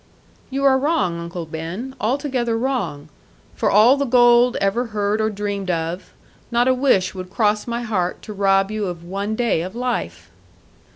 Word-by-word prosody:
'You 275 +1 -3
are 265 -1 +5
wrong, 205 - 0
Uncle 170 0 -6
Ben; 170 +12 -6
altogether 245 -1 0
wrong. 200 - -2 0.5
For 215 - 0
all 225 +7 +6
the 280 - 0
gold 240 0 +5
ever 200 +5 0
heard 210 0 -1
or 220 - +1
dreamed 200 -2 -4
of, 165 +1 -3 0.4
not 240 +1 +2
a 260 - +5
wish 255 -8 +2
would 185 -1 -7
cross 210 +2 0
my 235 0 -3
heart 185 -6 -2
to 215 - -7
rob 195 0 +2
you 215 -2 -2
of 175 -2 -6
one 200 +4 -3
day 235 -8 +1
of 185 +5 -6
life.' 90 - -3
210 Hz, 170 wpm, -21 LUFS, 185-245 Hz, 0.5 s, all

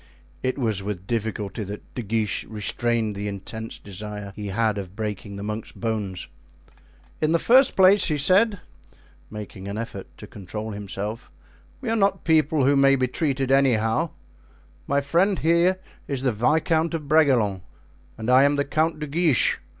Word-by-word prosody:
It 130 +1 -1
was 110 -7 0
with 95 -2 -5
difficulty 110 -1 -3
that 105 +1 -9
De 125 - -4
Guiche 110 -1 -1
restrained 110 +1 -1
the 100 +1 -4
intense 105 +3 -6
desire 105 0 -7
he 105 -1 -6
had 105 +1 0
of 95 -1 -8
breaking 105 -2 -5
the 100 - -6
monk's 105 +1 -5
bones. 105 -5 -3 0.9
"In 155 +1 +2
the - - +5
first 255 +9 +5
place," 190 +1 +6
he 155 -4 0
said, 195 +6 +3 0.7
making 100 -2 -8
an 100 +1 -4
effort 115 +1 -6
to - - -9
control 105 +3 -7
himself, 105 +2 -6 0.5
"we 250 - -3
are - - +2
not 195 -3 +1
people 155 -3 +3
who 140 +1 +4
may 135 0 +5
be 130 -1 +1
treated 135 -1 -1
anyhow; 130 +2 +2 0.8
my 140 0 +2
friend 175 +7 +2
there 170 +3 +3 0.3
is 135 -2 -2
the 130 - +2
Viscount 160 +8 +1
of 150 -3 -5
Bragelonne 130 - +3 0.6
and 110 - -6
I 130 +1 +7
am 145 +1 +3
the 140 0 0
Count 155 +2 0
de 150 - -4
Guiche. 155 -2 +2
120 Hz, 165 wpm, -24 LUFS, 105-155 Hz, 0.9 s, I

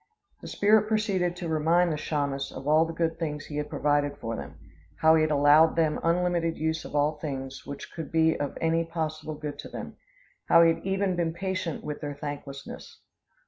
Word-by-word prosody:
The - - -9
spirit 215 +1 +3
proceeded 195 -5 0
to 180 -1 -5
remind 165 +2 +2
the - - -1
Chaymas 140 -2 -2
of 135 - -8
all 155 +2 +5
the 165 - -5
good 165 -1 -1
things 150 -3 -3
he 150 - -6
had 150 0 -3
provided 145 -1 0
for 115 -1 -4
them; - - -8 0.5
how 160 0 +6
he 160 - +4
had 155 - +2
allowed 150 +2 +5
them 160 -2 +1
unlimited 170 -1 +1
use 160 0 -1
of - - -8
all 150 +1 +1
things 135 -3 -6
which 140 0 -8
could 165 - -6
be 160 0 +3
of 145 - -4
any 165 0 +1
possible 155 -2 -4
good 150 -1 -6
to - - -8
them; - - -8 0.5
how 170 - +7
he 165 0 +5
had 165 - -10
even 195 -1 0
been 165 -2 -1
patient 185 -3 -3
with 150 -1 -5
their 145 -1 -4
thanklessness. 140 -1 -8
160 Hz, 200 wpm, -27 LUFS, 145-170 Hz, 0.5 s, how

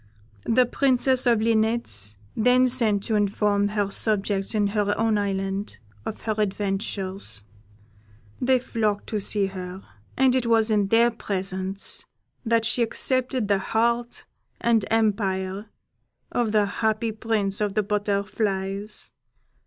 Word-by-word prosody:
The 250 +2 +4
Princess 260 0 +2
of 230 -3 +4
Linnets 220 - 0 0.2
then 250 +3 +4
sent 230 -6 +1
to 225 - -2
inform 205 0 +2
her 205 -1 -1
subjects 200 -1 0
in 210 -1 +2
her 205 0 0
own 225 -1 +2
island 195 - -2 0.3
of 215 - -5
her 220 - -1
adventures: 195 - -2 1.0
they 255 +1 +4
flocked 215 -4 -1
to 215 - -1
see 200 0 0
her, 185 0 -7 0.3
and 260 -1 +4
it 250 -2 +1
was 225 -1 +3
in 205 -2 +2
their 230 +3 +4
presence 190 -2 -3 0.4
that 230 -1 +2
she 240 - +1
accepted 255 0 +1
the 200 -1 +2
heart 235 +4 -1 0.3
and 230 -2 +2
empire 200 -2 0 0.6
of 235 -3 0
the 210 -1 +3
happy 220 +2 -1
Prince 215 -2 -1
of 205 -2 -1
the 215 - +2
Butterflies. 200 0 -1
210 Hz, 130 wpm, -25 LUFS, 195-230 Hz, 1.0 s, The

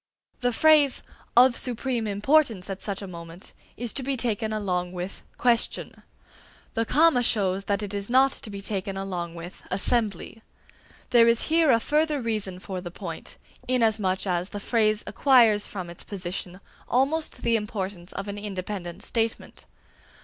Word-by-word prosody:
The 245 -1 +1
phrase 295 +1 +4 0.3
"of 250 0 +7
supreme 240 -2 -1
importance 205 -2 +2
at 190 - -6
such 200 -1 -3
a - - -6
moment" 170 0 -10 0.2
is 240 -1 -3
to - - -2
be 270 +1 -2
taken 220 -2 -1
along 180 -4 -2
with 180 +2 -6 0.2
"question"; 240 -2 0 0.7
the 225 - 0
comma 310 0 +4
shows 195 -4 +1
that 200 +1 0
it 205 0 -5
is 200 +1 -3
not 265 +2 +5
to 220 - -7
be 200 -1 -7
taken 195 -1 -3
along 180 -3 -4
with 170 +2 -9
"assembly." 215 +2 0 0.7
There 235 -1 +6
is 230 +4 +3
here 325 -2 +5
a 230 -3 +5
further 300 +4 +1
reason 215 -6 -2
for 185 0 -6
the 175 - -6
point, 175 - -8 0.3
inasmuch 220 -7 +1
as 180 0 -1
the 205 - -6
phrase 215 0 +1
acquires 230 -7 +4
from 185 -3 -6
its 170 0 -8
position 185 -1 -6 0.3
almost 285 +6 +1
the 230 0 +3
importance 195 -4 -4
of 195 - -5
an 205 0 -5
independent 190 -2 -5
statement. 225 -1 -2
210 Hz, 155 wpm, -26 LUFS, 190-240 Hz, 0.7 s, of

